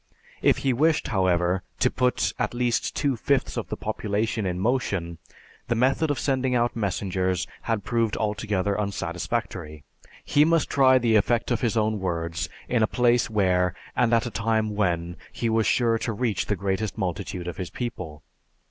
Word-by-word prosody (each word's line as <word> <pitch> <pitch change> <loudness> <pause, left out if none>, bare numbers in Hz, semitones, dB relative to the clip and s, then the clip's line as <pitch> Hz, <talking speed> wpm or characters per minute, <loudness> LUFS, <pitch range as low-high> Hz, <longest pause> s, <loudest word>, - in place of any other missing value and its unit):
If - - +4
he 135 - +3
wished, 155 +5 +2
however, 90 -3 +2 0.2
to - - +2
put 125 -1 +1
at - - -1
least 120 -1 0
two 140 -3 +1
fifths 135 +4 0
of - - -3
the - - -5
population 105 0 -2
in 90 0 -2
motion, 95 -8 -1 0.5
the 120 - +1
method 135 +6 +2
of 145 - 0
sending 130 -2 0
out 120 0 +1
messengers 95 -3 -1 0.2
had 110 -4 -1
proved 115 -1 0
altogether 105 -2 -1
unsatisfactory. 75 -6 -3 0.4
He 145 - +4
must 165 0 +2
try 130 -2 +5
the 115 -3 +3
effect 115 +3 +1
of 120 - +1
his 115 -1 0
own 110 -1 +1
words 85 -3 -2 0.2
in 120 -2 +1
a 110 - +4
place 120 0 +2
where, 90 -4 +2 0.2
and 120 -2 +2
at 115 0 +3
a 120 - -4
time 110 0 0
when, 85 -4 -1
he 115 - -2
was 110 -1 +2
sure 115 -2 +2
to 115 - -2
reach 115 -1 -1
the 105 - +1
greatest 100 +2 -2
multitude 90 -1 -3
of 90 - -5
his 90 -2 -4
people. 90 -11 -6
110 Hz, 175 wpm, -25 LUFS, 95-120 Hz, 0.5 s, try